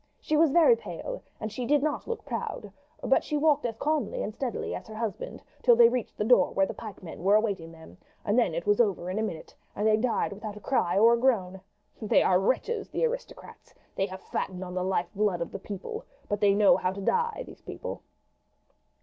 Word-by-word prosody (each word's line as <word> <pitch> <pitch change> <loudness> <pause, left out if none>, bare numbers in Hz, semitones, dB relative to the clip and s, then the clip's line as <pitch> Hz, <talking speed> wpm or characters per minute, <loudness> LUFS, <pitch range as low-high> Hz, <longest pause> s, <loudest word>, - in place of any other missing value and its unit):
She 310 - -1
was 315 +1 +5
very 345 - +6
pale, - - -7 0.2
and 215 - -4
she 245 +4 -4
did 290 -1 +3
not 305 -1 -2
look 465 -2 -4
proud, - - -5 0.3
but - - +3
she 300 - -2
walked 295 -3 +3
as 225 - -5
calmly 315 - -1
and - - -4
steadily 245 +1 -3
as - - -6
her 220 - -9
husband 230 - -5 0.2
till 480 - +6
they 470 0 +7
reached 250 -4 -3
the - - 0
door 245 +3 +5
where 195 - +3
the - - -5
pikemen 190 -6 -9
were 200 +2 +5
awaiting 200 -7 0
them, 160 - -15 0.3
and 205 - +1
then 230 -10 +2
it 170 - -3
was 205 +3 +4
over 185 -5 0
in 200 - -2
a - - 0
minute, 180 -8 -5 0.2
and 210 - -1
they 215 0 +4
died 230 -2 0
without 210 0 -7
a - - -8
cry 195 -6 0
or 230 +3 +6
a 235 - +2
groan. 190 -8 +1 0.4
They 215 - +3
are 180 -1 +4
wretches, 415 - -1
the - - 0
aristocrats. - - -7 0.2
They 195 - 0
have 190 -1 -9
fattened 185 0 -4
on 180 -1 -7
the 180 0 -1
life 185 -1 -1
blood 205 -3 +1
of 170 - -4
the 195 - -6
people; 210 - -6 0.2
but 205 -1 -1
they 200 -1 +4
know 205 -1 +5
how 185 - 0
to 200 - -7
die, 465 - 0
these - - -13
people." - - -7
215 Hz, 225 wpm, -28 LUFS, 190-290 Hz, 0.4 s, they